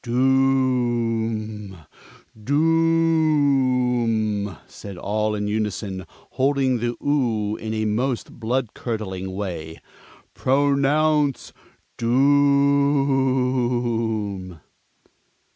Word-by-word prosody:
"Doom, 120 -5 0 0.7
doom!" 135 - +1
said 100 -3 -10
all 105 +3 -1
in 105 0 -3
unison, 105 -3 -3
holding 135 -2 -1
the 120 +1 -2
"oo" 115 -8 0
in 110 - -5
a 110 0 -1
most 120 +4 -1
blood 120 0 -2
curdling 95 -5 -5
way. 85 -5 -5 0.5
"Pronounce 145 +2 +1 0.4
doom!" 130 - +1
120 Hz, 65 wpm, -22 LUFS, 110-140 Hz, 0.7 s, doom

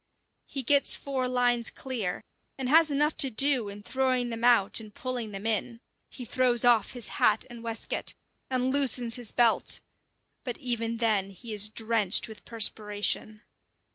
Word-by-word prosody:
He 270 - -2
gets 280 +3 +4
four 265 -2 -3
lines 245 -2 +1
clear, 225 -9 -4 0.3
and 265 -2 -3
has 320 +2 +5
enough 295 +2 +1
to 270 - +4
do 255 -2 +1
in 205 +1 -10
throwing 255 -1 0
them 230 0 -6
out 235 -5 +4
and 215 -2 -11
pulling 245 0 -4
them 195 +1 -7
in. 225 +1 -1 0.3
He 250 - -9
throws 245 0 +2
off 235 -4 +3
his 245 -3 -4
hat 215 0 +3
and 235 -1 -10
waistcoat, 230 -1 -4 0.3
and 255 0 0
loosens 255 -4 +1
his 240 -4 -4
belt 235 -2 +2 0.6
but 245 -3 -4
even 230 -2 -2
then 215 -4 +1
he 205 +4 -8
is 210 0 +3
drenched 220 -3 +2
with 220 -1 -12
perspiration. 215 -1 0
235 Hz, 160 wpm, -28 LUFS, 215-255 Hz, 0.6 s, has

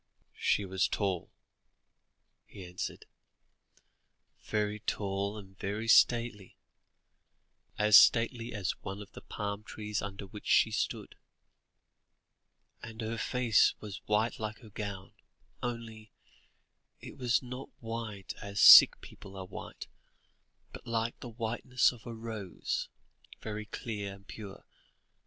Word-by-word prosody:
"She 100 - +2
was 95 0 +1
tall," 95 -4 -2 1.2
he 95 - -10
answered; 90 +1 -6 1.4
"very 105 0 -1
tall 100 0 -2
and 95 -2 -12
very 105 +3 -3
stately, 115 -4 +3 1.2
as 105 0 +7
stately 115 0 +4
as 100 -4 -1
one 95 0 -6
of 100 - -18
the - - -11
palm 100 0 -4
trees 105 -1 -4
under 100 0 -6
which 105 +2 -11
she - - +4
stood; - - -3 1.7
and 110 0 -10
her 110 +1 -3
face 125 -4 +3
was 105 -3 -8
white 105 +2 +1
like 110 +1 -5
her 110 -3 -14
gown, 100 -2 -6 0.5
only, 115 -3 -6 0.9
it - - -10
was 125 -1 +1
not 125 +2 -7
white 115 -4 -6
as 100 0 -5
sick - - +10
people 95 0 -12
are 95 - -6
white, - - -8 0.9
but - - -11
like 115 0 -2
the 125 - -8
whiteness 120 +2 +1
of 120 -2 -13
a 120 - -5
rose, 110 -5 -4 0.5
very 105 -1 -5
clear 105 -5 -5
and 100 +1 -19
pure. 100 -3 -10
105 Hz, 120 wpm, -31 LUFS, 100-115 Hz, 1.7 s, sick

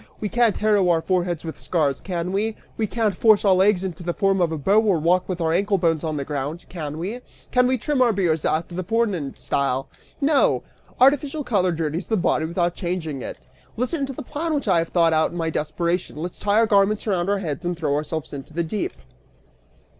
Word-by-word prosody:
We 210 - -2
can't 235 -2 +2
harrow 210 -4 +3
our 170 -1 +4
foreheads 175 -1 -1
with 160 - -6
scars, 145 -6 0
can 180 -1 -3
we? 215 +3 -1 0.2
We 220 - -1
can't 215 -3 0
force 215 +1 +4
our 195 - +6
legs 190 0 +3
out 190 - -1
into 170 - -14
the 175 0 -3
form 195 -2 +2
of 170 -2 +2
a 160 - -2
bow 195 +9 +3
or 205 -5 +2
walk 175 +4 +1
with 180 -1 -2
our 165 -1 +1
ankle 200 +3 +2
bones 165 -3 +1
on 155 -2 -2
the 140 - -3
ground, 145 +3 -4
can 155 -4 -5
we? 205 +9 -4 0.3
Can 250 0 +4
we 260 0 +2
trim 270 +3 0
our 245 -2 +5
beards 175 -6 0
after 165 +3 -1
the 185 +2 -3
foreign 190 -8 -1
style? 135 -1 -1 0.3
No! 285 0 +3 0.4
Artificial 285 +3 +3
color 190 -8 +1
dirties 165 +1 -3
the 220 - +1
body 160 -3 +1
without 170 +1 0
changing 170 -7 -3
it. - - -6 0.4
Listen 275 +4 -1
to 270 - -5
the - - -7
plan 310 +4 -2
which 280 - -2
I 180 -4 +4
have 165 - -2
thought 165 -2 +3
out 160 0 +3
in 175 - -8
my 165 -1 -1
desperation; 170 +4 -2
let's 170 +4 -6
tie 205 0 +1
our 225 - +5
garments 205 0 +2
around 190 -3 0
our 205 - +2
heads 170 -3 -4
and 175 0 -2
throw 150 -4 0
ourselves 155 +1 -3
into 140 +2 -8
the 170 - +1
deep!" 210 - -3
180 Hz, 225 wpm, -23 LUFS, 160-215 Hz, 0.4 s, our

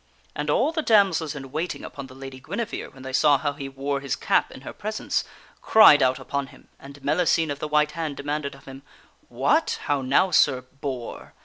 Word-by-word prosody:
And 150 0 -3
all 260 - +2
the 320 -1 -1
damsels 190 - +3
in 135 -2 -8
waiting 160 +5 -4
upon 140 -1 -8
the 130 - -14
Lady 135 -1 -9
Guinevere, 205 - -5
when 130 -1 -15
they 130 0 -7
saw 145 +1 +4
how 145 +1 -2
he 140 -1 -7
wore 140 +1 -3
his 140 -2 -3
cap - - +1
in - - -11
her - - -8
presence, 215 +1 -2 0.4
cried 215 -10 +7
out 130 0 +3
upon 140 -1 -4
him, - - -18
and 140 +1 -12
Mellicene 160 +1 +2
of 140 - -5
the 155 - -3
White 150 0 +2
Hand 160 -4 -4
demanded 145 0 -3
of 135 - -18
him: 135 0 -10 0.3
" - - -36
What! - - +2
How 145 -2 0
now, 140 +8 +2
Sir 135 -5 +4
boor! 130 -1 -7
145 Hz, 210 wpm, -24 LUFS, 135-160 Hz, 0.4 s, cried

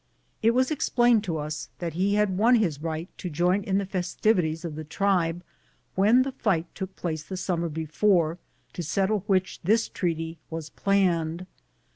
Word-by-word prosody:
It 230 +1 +3
was 255 +3 +2
explained 240 -6 +3
to 165 -4 -2
us 150 0 -5
that 170 -3 -4
he 195 +4 +1
had 210 -3 +2
won 230 +6 +5
his 170 -11 0
right 160 +1 -3
to 180 - -4
join 175 +5 +2
in 190 0 0
the 200 - 0
festivities 180 -3 0
of 165 - -4
the 155 +1 -6
tribe 175 0 0 0.5
when 220 +7 +5
the 270 - -3
fight 190 -10 0
took 190 -1 -6
place 160 -3 -3
the 185 +5 -7
summer 175 -2 -1
before, 160 +2 +1 0.3
to - - -4
settle 195 +6 +1
which 185 -2 +1
this 220 +5 +3
treaty 165 -2 -3
was 160 -1 -6
planned. 180 -3 +1
180 Hz, 170 wpm, -26 LUFS, 165-200 Hz, 0.5 s, won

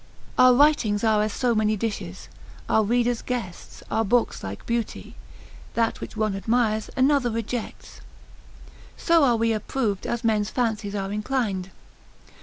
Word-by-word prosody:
Our 255 -1 +6
writings 245 -8 +3
are 215 -2 +3
as 215 0 0
so 245 +1 0
many 215 -1 +1
dishes, 195 -4 -5 0.4
our 220 - +3
readers 240 +2 +1
guests, 230 -9 -6
our 225 - +1
books 235 +3 +1
like 95 +1 -7
beauty, 235 -1 -3 0.6
that 230 -1 0
which - - -8
one 215 -2 0
admires 220 +1 0
another 265 -1 +3
rejects; 230 +1 -5 1.0
so 335 -2 +3
are 245 -4 +4
we 230 0 +1
approved 215 -1 -2
as 235 - -2
men's 215 -2 +1
fancies 220 -4 -2
are 195 -1 -3
inclined. 210 -4 -2
225 Hz, 140 wpm, -24 LUFS, 210-245 Hz, 1.0 s, Our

